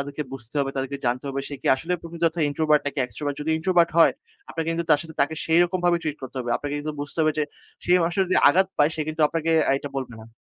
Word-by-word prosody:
তাদেরকে 145 Hz, +2 st, -4 dB, 0.2 s
বুঝতে 120 Hz, +4 st, -11 dB
হবে, 135 Hz, -1 st, -1 dB
তাদেরকে 135 Hz, +1 st, -2 dB
জানতে 125 Hz, +3 st, -1 dB
হবে 135 Hz, 0 st, -2 dB
সে 145 Hz, -, -6 dB
কি -, -, -6 dB
আসলে 170 Hz, +6 st, -4 dB
প্রকৃত 170 Hz, 0 st, -10 dB
অর্থ 165 Hz, -, -18 dB
introvert 150 Hz, +1 st, +2 dB
নাকি 145 Hz, -, -3 dB
extrovert 145 Hz, +2 st, -4 dB
যদি 155 Hz, -, -2 dB
introvert 175 Hz, -1 st, +3 dB
হয় 165 Hz, -, +7 dB, 0.4 s
আপনাকে 165 Hz, 0 st, -3 dB
কিন্তু 170 Hz, 0 st, -1 dB
তার 150 Hz, -, +6 dB
সাথে 160 Hz, -2 st, -11 dB
তাকে 160 Hz, +3 st, +2 dB
সেইরকম 175 Hz, +3 st, +3 dB
ভাবে 175 Hz, -1 st, +4 dB
ট্রিট 155 Hz, -1 st, -3 dB
করতে 130 Hz, +1 st, -8 dB
হবে। 120 Hz, -, -4 dB
আপনাকে 145 Hz, 0 st, -5 dB
কিন্তু 155 Hz, +1 st, -4 dB
বুঝতে 145 Hz, +3 st, -7 dB
হবে 155 Hz, 0 st, +3 dB
যে, 150 Hz, -, +2 dB, 0.4 s
সে 175 Hz, -, +2 dB
মানুষ 170 Hz, +1 st, 0 dB
যদি 185 Hz, -, -1 dB
আঘাত 190 Hz, +6 st, +4 dB
পায় 150 Hz, +2 st, +4 dB
সে 155 Hz, -, -4 dB
কিন্তু 155 Hz, 0 st, -4 dB
আপনাকে 165 Hz, 0 st, -1 dB, 0.3 s
এটা 145 Hz, -, -5 dB
বলবে 130 Hz, -3 st, -4 dB
না। 110 Hz, -, -13 dB
155 Hz, 250 wpm, -24 LUFS, 140-165 Hz, 0.4 s, হয়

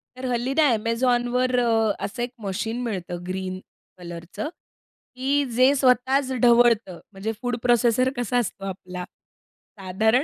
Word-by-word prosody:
तर 255 Hz, +1 st, -7 dB
हल्ली 245 Hz, +3 st, -1 dB
ना 315 Hz, -, +4 dB
Amazonवर 245 Hz, +2 st, +1 dB
अ, 225 Hz, -3 st, +2 dB
असं 240 Hz, +4 st, -4 dB
1 245 Hz, -, -4 dB
मशीन 220 Hz, +5 st, -3 dB
मिळतं 180 Hz, -6 st, -4 dB
ग्रीन 185 Hz, 0 st, -4 dB, 0.4 s
कलरचं, 175 Hz, -, -7 dB, 0.7 s
की 275 Hz, +3 st, +1 dB
जे 255 Hz, +2 st, +5 dB
स्वतःच 260 Hz, +1 st, +2 dB
ढवळतं. 235 Hz, -6 st, +4 dB
म्हणजे 200 Hz, +2 st, -4 dB
फूड 245 Hz, -1 st, -1 dB
प्रोसेसर 240 Hz, +1 st, +3 dB
कसा 245 Hz, 0 st, 0 dB
असतो 205 Hz, -4 st, -2 dB
आपला. 180 Hz, -1 st, -6 dB, 0.8 s
साधारण 220 Hz, +7 st, +2 dB
235 Hz, 130 wpm, -24 LUFS, 195-250 Hz, 0.8 s, जे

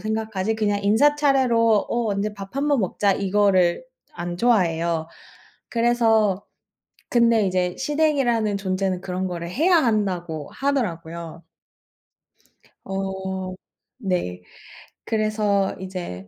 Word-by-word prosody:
생각하지 220 Hz, -1 st, -2 dB
그냥 205 Hz, -2 st, 0 dB
인사 225 Hz, +9 st, +4 dB
차례로 245 Hz, -7 st, +3 dB
"어, 235 Hz, -1 st, 0 dB
언제 210 Hz, +1 st, -2 dB
밥 200 Hz, +5 st, -9 dB
한번 285 Hz, -3 st, +2 dB
먹자." 195 Hz, +1 st, +1 dB
이거를 195 Hz, 0 st, +2 dB, 0.3 s
안 175 Hz, 0 st, -5 dB
좋아해요. 170 Hz, -8 st, +1 dB, 0.6 s
그래서 225 Hz, -4 st, +2 dB, 0.7 s
근데 235 Hz, -3 st, +4 dB
이제 180 Hz, -1 st, 0 dB
시댁이라는 265 Hz, -8 st, +1 dB
존재는 185 Hz, -1 st, -1 dB
그런 185 Hz, 0 st, -3 dB
거를 170 Hz, -1 st, -5 dB
해야 340 Hz, -, +3 dB
한다고 185 Hz, -, 0 dB
하더라고요. 170 Hz, -, -3 dB, 1.4 s
어. 190 Hz, -1 st, -4 dB, 0.4 s
네. 175 Hz, -, -2 dB, 0.6 s
그래서 215 Hz, -3 st, 0 dB
이제 180 Hz, -, -6 dB
200 Hz, 230 characters per minute, -23 LUFS, 185-230 Hz, 1.4 s, 인사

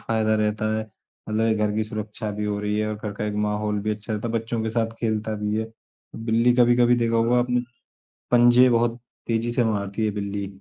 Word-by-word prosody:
फ़ायदा 110 Hz, -1 st, +1 dB
रहता 110 Hz, 0 st, 0 dB
है 110 Hz, -, -1 dB, 0.5 s
मतलब 110 Hz, +1 st, +1 dB
एक 110 Hz, -1 st, +1 dB
घर 105 Hz, -1 st, +1 dB
की 110 Hz, -, +1 dB
सुरक्षा 105 Hz, 0 st, -5 dB
भी 105 Hz, +1 st, -3 dB
हो 105 Hz, 0 st, -1 dB
रही 105 Hz, 0 st, -1 dB
है 110 Hz, -, 0 dB
और 110 Hz, -, -2 dB
घर 105 Hz, 0 st, -5 dB
का 105 Hz, -, -4 dB
एक 105 Hz, -1 st, -2 dB
माहौल 105 Hz, 0 st, -1 dB
भी 110 Hz, +1 st, -2 dB
अच्छा 105 Hz, +1 st, -7 dB
रहता 105 Hz, +2 st, -2 dB
है, 115 Hz, -, -4 dB
बच्चों 115 Hz, 0 st, -2 dB
के 110 Hz, -, -2 dB
साथ 115 Hz, 0 st, -1 dB
खेलता 110 Hz, -1 st, -1 dB
भी 105 Hz, 0 st, 0 dB
है। 110 Hz, 0 st, -4 dB, 0.5 s
बिल्ली 115 Hz, +2 st, +3 dB
कभी-कभी 120 Hz, 0 st, +5 dB
देखा 115 Hz, -1 st, +1 dB
होगा 115 Hz, +2 st, +3 dB
आपने, 125 Hz, 0 st, +1 dB, 0.7 s
पंजे 120 Hz, +1 st, +6 dB
बहुत 120 Hz, 0 st, +1 dB, 0.3 s
तेज़ी 115 Hz, +1 st, 0 dB
से 120 Hz, +1 st, +1 dB
मारती 105 Hz, 0 st, -1 dB
है 105 Hz, -, 0 dB
बिल्ली। 100 Hz, -1 st, -3 dB
110 Hz, 220 wpm, -24 LUFS, 105-115 Hz, 0.7 s, पंजे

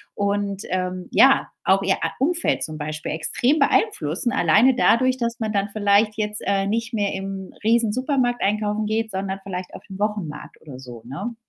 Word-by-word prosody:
und, 200 Hz, -1 st, -1 dB
ähm, 185 Hz, 0 st, -3 dB
ja, 270 Hz, +1 st, +5 dB, 0.2 s
auch 195 Hz, +1 st, +4 dB
ihr 190 Hz, 0 st, +2 dB
a -, -, 0 dB
Umfeld 340 Hz, +6 st, +1 dB
zum 155 Hz, -1 st, -5 dB
Beispiel 155 Hz, 0 st, -5 dB
extrem 245 Hz, -, +1 dB
beeinflussen, 240 Hz, -, +1 dB
alleine 235 Hz, +5 st, +4 dB
dadurch, 255 Hz, +1 st, +3 dB
dass 235 Hz, -1 st, -3 dB
man 220 Hz, -1 st, -2 dB
dann 200 Hz, +1 st, 0 dB
vielleicht 210 Hz, 0 st, +2 dB
jetzt, 210 Hz, 0 st, -2 dB
äh, 195 Hz, 0 st, +1 dB
nicht 230 Hz, +3 st, -2 dB
mehr 205 Hz, -2 st, 0 dB
im 195 Hz, 0 st, -6 dB
Riesensupermarkt 245 Hz, +3 st, +1 dB
einkaufen 210 Hz, +1 st, 0 dB
geht, 220 Hz, +1 st, -1 dB
sondern 190 Hz, 0 st, -3 dB
vielleicht 185 Hz, -2 st, -6 dB
auf -, -, -10 dB
den 190 Hz, -, -8 dB
Wochenmarkt 205 Hz, -8 st, -4 dB
oder 140 Hz, -5 st, -11 dB
so, 120 Hz, -3 st, -10 dB
ne? 195 Hz, -, -5 dB
205 Hz, 170 wpm, -22 LUFS, 190-235 Hz, 0.2 s, ja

